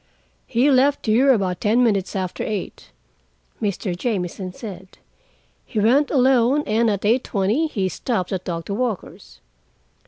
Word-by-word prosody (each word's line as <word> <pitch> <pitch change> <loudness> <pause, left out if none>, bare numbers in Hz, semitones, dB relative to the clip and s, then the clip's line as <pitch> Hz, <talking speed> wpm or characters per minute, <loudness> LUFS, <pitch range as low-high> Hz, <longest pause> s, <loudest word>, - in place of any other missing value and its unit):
"He 255 +5 +2
left 275 +2 +3
here 245 +5 +4
about 190 -7 0
ten 230 +4 +3
minutes 200 -5 0
after 185 -2 -3
eight," 210 -4 -5 0.7
Mr. 200 -3 -2
Jamieson 185 -3 -3
said. 190 -2 -10 0.7
"He 220 - -4
went 260 +8 +3
alone, 260 +1 +3
and 225 +2 +2
at 205 -1 -2
eight 235 +4 +3
twenty 215 +10 0
he 200 -10 -2
stopped 185 -1 -3
at 185 -1 -3
Doctor 170 +2 -4
Walker's. 200 - -5
215 Hz, 135 wpm, -21 LUFS, 190-250 Hz, 0.7 s, here